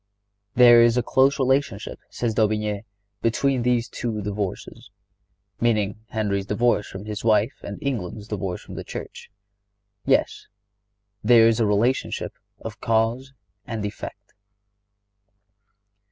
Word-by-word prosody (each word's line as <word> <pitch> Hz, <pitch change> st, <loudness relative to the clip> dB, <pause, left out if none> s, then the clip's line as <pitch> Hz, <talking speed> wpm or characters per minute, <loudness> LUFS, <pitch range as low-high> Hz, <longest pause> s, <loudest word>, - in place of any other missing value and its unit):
"There 120 Hz, -1 st, +8 dB
is 120 Hz, +1 st, +4 dB
a 125 Hz, -, +2 dB
close 135 Hz, +4 st, +3 dB
relationship," 130 Hz, -5 st, 0 dB
says 120 Hz, -2 st, -2 dB
D'Aubigné, 105 Hz, -1 st, 0 dB, 0.4 s
"between 130 Hz, +3 st, +1 dB
these 120 Hz, 0 st, +1 dB
two 110 Hz, -3 st, -4 dB
divorces," 105 Hz, +3 st, -5 dB, 0.7 s
meaning 105 Hz, -3 st, +1 dB
Henry's 100 Hz, -3 st, -1 dB
divorce 105 Hz, 0 st, +1 dB
from 95 Hz, +2 st, -8 dB
his 105 Hz, -1 st, -5 dB
wife 110 Hz, -1 st, +3 dB
and 100 Hz, -, -7 dB
England's 110 Hz, -6 st, -3 dB
divorce 95 Hz, -4 st, -4 dB
from -, -, -11 dB
the -, -, -6 dB
Church. -, -, -8 dB, 0.7 s
Yes, -, -, +1 dB, 0.8 s
there 115 Hz, 0 st, +7 dB
is 115 Hz, 0 st, +2 dB
the 110 Hz, -, +3 dB
relationship 110 Hz, +6 st, 0 dB, 0.3 s
of -, -, -8 dB
cause 115 Hz, +4 st, 0 dB, 0.3 s
and 110 Hz, -2 st, -3 dB
effect. 105 Hz, -, -8 dB
110 Hz, 120 wpm, -24 LUFS, 105-120 Hz, 0.8 s, There